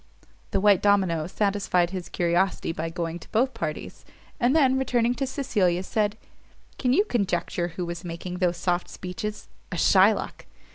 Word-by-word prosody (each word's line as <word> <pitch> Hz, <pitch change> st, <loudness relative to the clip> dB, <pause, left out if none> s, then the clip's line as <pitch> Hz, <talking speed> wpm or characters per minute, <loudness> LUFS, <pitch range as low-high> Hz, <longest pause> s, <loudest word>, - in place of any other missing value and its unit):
The -, -, 0 dB
white 200 Hz, -2 st, +4 dB
domino 190 Hz, -6 st, +2 dB
satisfied 195 Hz, -3 st, +1 dB
his 180 Hz, -3 st, -5 dB
curiosity 175 Hz, +1 st, 0 dB
by 165 Hz, 0 st, -4 dB
going 165 Hz, 0 st, -4 dB
to -, -, -15 dB
both 255 Hz, +4 st, +1 dB
parties; 155 Hz, -2 st, -5 dB, 0.4 s
and 250 Hz, +3 st, +3 dB
then, 265 Hz, -5 st, +4 dB
returning 245 Hz, -2 st, +1 dB
to 270 Hz, +1 st, -2 dB
Cecilia, 200 Hz, -10 st, 0 dB
said, 210 Hz, +1 st, -1 dB, 0.6 s
"Can 250 Hz, -, +1 dB
you 400 Hz, +11 st, +4 dB
conjecture 180 Hz, -, -1 dB
who 175 Hz, +1 st, -5 dB
was 170 Hz, +1 st, -6 dB
making 175 Hz, +1 st, -6 dB
those 175 Hz, -2 st, +1 dB
soft 175 Hz, 0 st, -1 dB
speeches? 210 Hz, +4 st, -6 dB, 0.2 s
a -, -, -3 dB
Shylock! -, -, +3 dB
185 Hz, 155 wpm, -25 LUFS, 175-225 Hz, 0.6 s, white